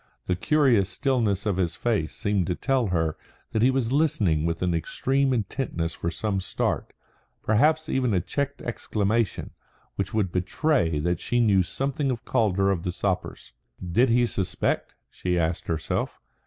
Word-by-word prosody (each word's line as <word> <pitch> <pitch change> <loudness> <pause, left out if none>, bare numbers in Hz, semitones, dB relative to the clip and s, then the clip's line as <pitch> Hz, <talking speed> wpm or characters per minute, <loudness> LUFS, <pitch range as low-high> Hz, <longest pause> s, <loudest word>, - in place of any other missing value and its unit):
The 90 - 0
curious 120 - +3
stillness 110 -8 0
of 100 -4 0
his 85 -3 0
face 105 -10 -1
seemed 100 -4 0
to 90 - 0
tell 135 -4 +1
her 80 -4 0 0.4
that 110 - 0
he 125 - +5
was 130 -3 0
listening 105 - +2
with 85 +1 -2
an 90 -1 +1
extreme 135 +11 0
intentness 105 -8 -2
for 85 - -3
some 100 +3 -1
start, 90 - -2 0.5
perhaps 155 +9 +3
even 130 -5 +1
a - - +3
checked 140 - -3
exclamation, 110 -1 -1 0.5
which 95 -2 -2
would 105 -5 0
betray 90 - +1
that 85 +3 0
she 120 - 0
knew 100 -5 +4
something 135 - -1
of 120 -2 -3
Calder 100 -3 +2
of 90 -4 -1
the 90 - -2
Sappers. 95 0 -3 0.3
Did 90 +9 +2
he 120 +1 +4
suspect, 95 -6 -1 0.2
she 90 -1 -1
asked 85 0 -1
herself? 80 -2 -2
100 Hz, 160 wpm, -26 LUFS, 90-125 Hz, 0.5 s, he